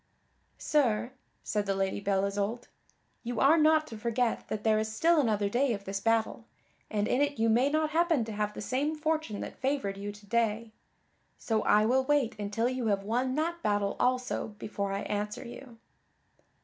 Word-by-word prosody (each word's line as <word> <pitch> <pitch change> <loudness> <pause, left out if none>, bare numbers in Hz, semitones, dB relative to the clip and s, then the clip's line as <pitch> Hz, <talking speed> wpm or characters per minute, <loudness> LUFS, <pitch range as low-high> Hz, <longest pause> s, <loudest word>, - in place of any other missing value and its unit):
"Sir," 245 -5 +1 0.3
said 205 -1 -1
the 195 - +1
Lady 195 0 -1
Belle 195 -1 +1
Isoult, 205 +4 -3 0.5
"you 240 -2 -4
are 280 +4 +6
not 310 -1 +4
to 225 -7 -9
forget 235 +1 -1
that 215 -1 -4
there 215 -1 +3
is 220 0 -2
still 325 +9 +3
another 210 -5 +1
day 245 +4 +1
of 200 -2 -6
this 195 0 -3
battle, 225 +1 0 0.4
and 210 -1 0
in 260 - +1
it 285 0 0
you 225 0 +2
may 245 +5 +3
not 310 +1 0
happen 325 -6 +2
to 225 - -6
have 210 0 -2
the - - -6
same 275 +8 -1
fortune 310 -8 -2
that - - -7
favored 260 -8 -1
you 205 +1 -5
to 205 0 -15
day; 225 0 0 0.7
so 220 -2 0
I 210 +1 +4
will 260 +3 +3
wait 280 -3 +1
until 210 +3 -1
you 255 -2 -2
have 200 -2 +1
won 250 +5 -1
that 335 +3 -1
battle 205 -4 0
also 255 0 0
before 200 -2 -4
I 195 +1 -2
answer 210 0 -3
you." 240 0 -11
225 Hz, 190 wpm, -29 LUFS, 205-265 Hz, 0.7 s, are